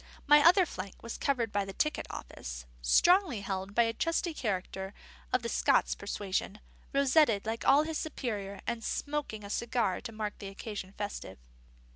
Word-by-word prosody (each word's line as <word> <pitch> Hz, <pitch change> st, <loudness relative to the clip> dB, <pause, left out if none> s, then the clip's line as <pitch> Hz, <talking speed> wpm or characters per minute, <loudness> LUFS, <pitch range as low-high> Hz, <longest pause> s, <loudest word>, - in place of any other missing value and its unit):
My 295 Hz, 0 st, +7 dB
other 360 Hz, +2 st, +7 dB
flank 185 Hz, -, -8 dB
was 230 Hz, -, -5 dB
covered 245 Hz, -6 st, 0 dB
by 205 Hz, 0 st, +1 dB
the 195 Hz, 0 st, -7 dB
ticket 305 Hz, +9 st, -1 dB
office, -, -, -7 dB, 0.2 s
strongly 330 Hz, -, +4 dB
held 195 Hz, 0 st, -4 dB
by 235 Hz, -, +6 dB
a 230 Hz, 0 st, 0 dB
trusty 330 Hz, +6 st, 0 dB
character 195 Hz, -5 st, -3 dB, 0.4 s
of 255 Hz, -1 st, +1 dB
the -, -, -1 dB
Scots -, -, +3 dB
persuasion, 200 Hz, 0 st, -3 dB, 0.3 s
rosetted 275 Hz, -6 st, +4 dB
like 225 Hz, +1 st, -2 dB, 0.2 s
his 320 Hz, -1 st, -2 dB
superior 210 Hz, -10 st, -4 dB
and 235 Hz, -1 st, -2 dB
smoking 285 Hz, -8 st, -3 dB
a 200 Hz, -, -8 dB
cigar 235 Hz, -5 st, 0 dB
to 235 Hz, -, -6 dB
mark 215 Hz, -1 st, -4 dB
the 200 Hz, -, -6 dB
occasion 195 Hz, -1 st, -6 dB
festive. 205 Hz, -, -5 dB
220 Hz, 160 wpm, -31 LUFS, 200-280 Hz, 0.4 s, My